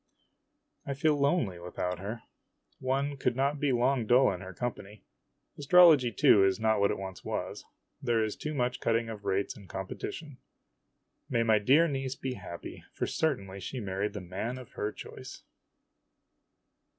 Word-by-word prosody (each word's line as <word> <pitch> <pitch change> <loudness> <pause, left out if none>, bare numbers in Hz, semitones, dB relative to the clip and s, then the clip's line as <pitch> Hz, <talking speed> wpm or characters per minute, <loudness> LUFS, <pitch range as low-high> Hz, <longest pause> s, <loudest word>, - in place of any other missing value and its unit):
I 140 - -4
feel 150 +2 +2
lonely 140 - +1
without 90 0 -4
her. 110 +4 -6 0.6
One 140 +2 -1
could 125 -2 0
not 140 +2 0
be 145 -1 +1
long 125 -1 +1
dull 125 +1 +5
in 90 - -7
her 95 0 -8
company. 105 0 -6 0.6
Astrology, 150 -4 +6
too, 100 -2 +5
is 95 +3 +2
not 110 -1 +2
what 100 - +3
it - - -1
once 95 -2 -7
was - - -4 0.4
there 120 -4 +2
is 110 - -2
too 150 0 -5
much 125 -1 0
cutting 115 0 0
of 105 -2 -8
rates 95 +1 0
and 100 -4 -14
competition. 125 - -6 0.9
May 115 - +2
my 110 -2 +4
dear 140 +11 +5
niece 135 -3 -3
be 130 -1 -4
happy, 90 -5 -9
for - - -1
certainly 100 -11 -1
she 125 +8 -5
married 100 -1 -2
the 105 - -5
man 100 +8 -4
of 130 0 -11
her 105 - -3
choice - - -10
115 Hz, 165 wpm, -30 LUFS, 100-135 Hz, 0.9 s, Astrology